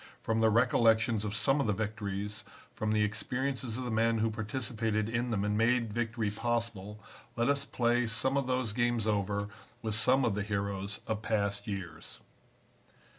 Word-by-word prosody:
From 115 0 -1
the 110 - +5
recollections 115 -1 +3
of 105 0 -3
some 135 +6 +3
of 140 - 0
the 105 - +2
victories, 105 0 -4 0.3
from 110 0 -2
the 105 0 +3
experiences 125 +3 -2
of 130 - -3
the 120 - -3
men 115 +1 +2
who 110 0 +1
participated 110 -1 -2
in 120 +2 -1
them 105 -3 0
and 105 0 0
made 115 0 +2
victory 115 -2 -1
possible, 115 -2 -2 0.4
let 120 0 +1
us 140 0 +1
play 120 -2 +1
some 115 +5 +1
of 140 -2 0
those 130 -4 0
games 120 -1 +1
over 100 -1 0 0.4
with 110 -1 -1
some 125 +4 +4
of 115 - +1
the 105 - -1
heroes 100 -1 -2
of 110 -1 -2
past 100 -2 -1
years. 95 -6 -6
110 Hz, 175 wpm, -31 LUFS, 105-120 Hz, 0.4 s, the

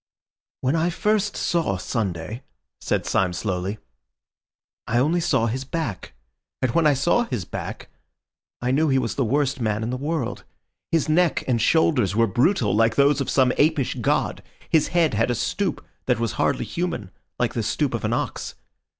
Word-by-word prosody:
"When 130 +4 +1
I 165 +2 +2
first 210 +3 0
saw 165 - 0
Sunday," 100 +1 -3 0.4
said - - -1
Syme 90 -2 +1
slowly, 95 +2 -2 1.1
"I 120 - +1
only 155 +8 +2
saw 165 -9 +2
his 125 +4 -2
back; 135 - -4 0.5
and 130 -2 0
when 165 +4 +3
I 145 - +4
saw 175 - +2
his 115 - -4
back, - - -6 0.8
I 125 - +1
knew 155 +3 +2
he 135 - +3
was 120 -4 -1
the 135 - 0
worst 135 +3 0
man 110 -1 0
in 115 - -2
the 125 - -2
world. 145 -2 -3 0.5
His 165 -3 +2
neck 165 +1 +2
and 120 -3 +1
shoulders 125 - +3
were 115 +1 +4
brutal, 125 - +2
like 115 +1 +3
those 140 +1 +4
of - - -2
some 130 -2 +3
apish 150 -3 +2
god. - - 0 0.3
His 160 - +3
head 170 -4 +2
had 115 +3 +1
a 120 - +1
stoop - - -2 0.2
that - - +2
was 115 -2 0
hardly - - 0
human, 170 - -3 0.3
like - - 0
the - - -1
stoop - - -1
of - - -3
an - - 0
ox. - - -3
130 Hz, 175 wpm, -23 LUFS, 115-160 Hz, 1.1 s, I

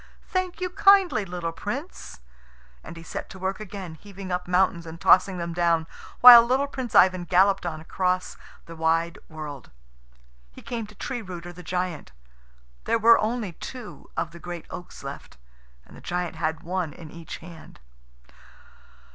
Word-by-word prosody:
Thank 370 -1 -2
you 365 -1 -3
kindly, 390 - +4
little 175 -2 -4
Prince." 245 - -7 0.6
And 170 - -10
he 165 - -10
set - - -6
to - - -10
work 190 +1 -3
again, 195 -4 -7
heaving 195 +2 -10
up 180 0 -2
mountains 180 -2 +1
and 160 +1 -9
tossing 185 +1 +5
them 170 -1 -4
down, 170 -1 +2 0.4
while 245 -1 +12
little 260 +4 +1
Prince 260 -4 -6
Ivan 185 -1 +5
galloped 190 +1 +3
on 155 -2 -4
across 180 +3 -1 0.3
the 165 - -10
wide 165 +3 0
world. 150 -4 -8 0.8
He - - -14
came 230 -3 -4
to 210 - -16
Tree 245 +4 -4
rooter, 175 -3 -8
the 180 - -11
giant. 180 - -4 0.7
There - - +2
were 230 +1 +6
only 220 -2 -2
two 240 +7 -10
of 165 - -2
the 170 - -12
great 175 -1 -7
oaks 175 -5 -9
left, 140 - -9 0.5
and - - -16
the - - -13
giant 180 -1 -3
had 160 0 -2
one 175 -3 -3
in 160 -1 -12
each 165 -2 -8
hand. 165 - -13
180 Hz, 165 wpm, -25 LUFS, 165-210 Hz, 0.8 s, while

